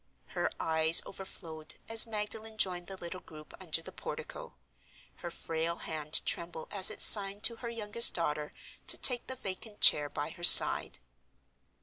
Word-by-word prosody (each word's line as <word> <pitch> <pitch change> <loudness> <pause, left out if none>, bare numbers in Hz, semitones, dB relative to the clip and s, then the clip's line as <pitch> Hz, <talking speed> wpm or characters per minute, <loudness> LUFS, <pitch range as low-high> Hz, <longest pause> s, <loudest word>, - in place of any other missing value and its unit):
Her - - -6
eyes 160 0 +2
overflowed 160 -5 -9
as 225 +1 +3
Magdalen 220 0 -7
joined 180 -4 -4
the 195 - -10
little 175 +1 -11
group 155 -3 -19
under 165 -2 -4
the - - -13
portico; - - -12 0.6
her 175 - -11
frail 165 0 -8
hand 155 -2 -2
trembled 170 -2 -7
as 195 -2 +1
it - - -1
signed 200 0 +2
to 230 0 0
her 235 0 -11
youngest 230 0 +3
daughter 150 -3 -6 0.4
to - - +3
take 245 -2 +1
the 260 - -8
vacant 205 -1 -11
chair 145 -1 +3
by 145 +2 -9
her 175 - -16
side. - - +7
185 Hz, 155 wpm, -27 LUFS, 160-215 Hz, 0.6 s, side